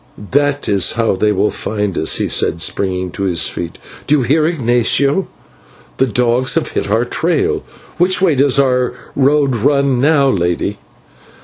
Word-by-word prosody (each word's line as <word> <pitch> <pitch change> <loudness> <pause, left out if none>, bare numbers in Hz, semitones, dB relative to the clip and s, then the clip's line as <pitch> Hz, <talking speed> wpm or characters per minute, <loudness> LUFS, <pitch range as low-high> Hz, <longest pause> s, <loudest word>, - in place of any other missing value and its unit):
"That 145 +1 0
is 100 -3 +2
how 115 -4 0
they 105 +3 +1
will 105 +1 0
find 105 -3 -3
us," 80 - +1
he - - -1
said, 85 - +1
springing 90 0 -1
to - - -8
his 85 -4 +1
feet. 85 -1 -6 0.3
"Do 150 - +4
you 145 - +1
hear, 150 +6 +2
Ignatio? 140 +3 +1 0.7
The 130 - +2
dogs 125 +2 +1
have - - -1
hit - - -3
our - - +1
trail. - - 0 0.4
Which 180 +1 +3
way 185 -4 +2
does 140 0 +2
our 125 -2 +1 0.2
road 140 -1 +2
run 140 +2 +1
now, 145 -1 +3
lady?" 95 -1 -1
125 Hz, 165 wpm, -15 LUFS, 100-140 Hz, 0.7 s, Do